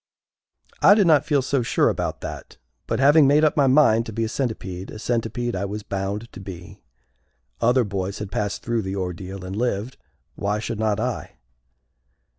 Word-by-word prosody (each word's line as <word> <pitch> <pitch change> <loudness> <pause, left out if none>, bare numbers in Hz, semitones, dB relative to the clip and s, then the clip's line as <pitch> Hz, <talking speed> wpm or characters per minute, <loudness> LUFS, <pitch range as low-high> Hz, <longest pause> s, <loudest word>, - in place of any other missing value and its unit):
I 205 - +8
did 210 -3 +4
not 155 -2 +4
feel 145 -4 +2
so 135 0 0
sure 120 - +2
about - - -2
that; - - -8 0.3
but, - - -1
having 145 +2 +6
made 145 +2 +4
up 155 - +3
my 140 -2 +4
mind 130 -5 +4
to - - -5
be 115 +2 -2
a 110 - -1
Centipede, 100 -8 -4
a - - -8
Centipede 120 +1 -2
I 95 +2 -2
was 105 +1 -5
bound 100 +3 -3
to - - -9
be. 95 +1 -10 0.8
Other 125 +2 +4
boys 100 -2 -3
had 105 -2 -6
passed 100 0 -2
through 115 -1 0
the 95 -1 -4
ordeal 95 0 -5
and 95 +1 -5
lived, 115 +1 -2 0.4
why 105 +1 -1
should 110 0 -4
not 110 -1 +1
I? 125 +1 -3
110 Hz, 185 wpm, -23 LUFS, 100-130 Hz, 0.8 s, I